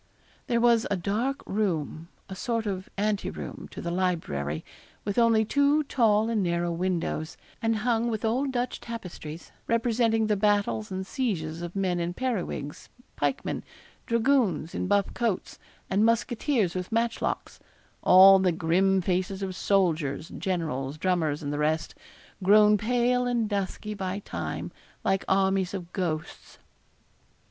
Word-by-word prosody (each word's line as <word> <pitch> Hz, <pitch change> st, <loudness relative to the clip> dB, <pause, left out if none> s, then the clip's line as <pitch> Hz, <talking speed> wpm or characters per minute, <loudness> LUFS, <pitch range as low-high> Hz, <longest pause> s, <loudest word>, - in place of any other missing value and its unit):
There 235 Hz, -3 st, +2 dB
was 235 Hz, -1 st, +4 dB
a 200 Hz, -, 0 dB
dark 225 Hz, +10 st, -1 dB
room, 170 Hz, -6 st, -2 dB, 0.2 s
a 190 Hz, -, -7 dB
sort 230 Hz, +4 st, -2 dB
of 190 Hz, -2 st, -4 dB
ante 205 Hz, 0 st, 0 dB
room, -, -, -7 dB
to -, -, -8 dB
the 170 Hz, -, -2 dB
library, 120 Hz, -, -1 dB, 0.4 s
with 200 Hz, +2 st, 0 dB
only 225 Hz, -2 st, +4 dB
two 285 Hz, +5 st, +3 dB
tall 225 Hz, -6 st, +2 dB
and 225 Hz, -2 st, +1 dB
narrow 175 Hz, -1 st, 0 dB
windows, 170 Hz, -2 st, -2 dB, 0.2 s
and 225 Hz, -1 st, +1 dB
hung 235 Hz, -1 st, +2 dB
with 220 Hz, -1 st, -2 dB
old 260 Hz, +5 st, +1 dB
Dutch 245 Hz, 0 st, -2 dB
tapestries, 175 Hz, -8 st, -8 dB, 0.2 s
representing 230 Hz, -1 st, +2 dB
the 215 Hz, -1 st, +2 dB
battles 200 Hz, -, +1 dB
and 190 Hz, 0 st, -3 dB
sieges 175 Hz, -, -2 dB
of 175 Hz, +1 st, -6 dB
men 185 Hz, -3 st, 0 dB
in 170 Hz, +1 st, -2 dB
periwigs, 205 Hz, -, -3 dB, 0.3 s
pikemen, 145 Hz, -2 st, -2 dB, 0.4 s
dragoons 230 Hz, -, +2 dB
in -, -, -2 dB
buff 200 Hz, 0 st, +1 dB
coats, 230 Hz, -6 st, -2 dB, 0.3 s
and 200 Hz, +3 st, +2 dB
musketeers 230 Hz, -, +1 dB
with 185 Hz, +2 st, -4 dB
matchlocks 230 Hz, 0 st, -1 dB, 0.4 s
all 190 Hz, +1 st, +8 dB
the 185 Hz, -1 st, +3 dB
grim 185 Hz, +4 st, +2 dB
faces 185 Hz, +2 st, -1 dB
of 190 Hz, -1 st, -4 dB
soldiers, 165 Hz, -6 st, +1 dB
generals, 155 Hz, -7 st, -3 dB
drummers, 160 Hz, -4 st, 0 dB
and 145 Hz, 0 st, -3 dB
the 145 Hz, -, -2 dB
rest, 155 Hz, +1 st, 0 dB, 0.5 s
grown 210 Hz, +2 st, +6 dB
pale 245 Hz, +3 st, +1 dB
and 240 Hz, -3 st, +1 dB
dusky 205 Hz, +1 st, -3 dB
by 190 Hz, -1 st, -3 dB
time, 205 Hz, -, -5 dB, 0.3 s
like 195 Hz, 0 st, +1 dB
armies 190 Hz, -1 st, +2 dB
of 175 Hz, -2 st, -7 dB
ghosts. 160 Hz, -4 st, -4 dB
195 Hz, 140 wpm, -27 LUFS, 175-225 Hz, 0.5 s, all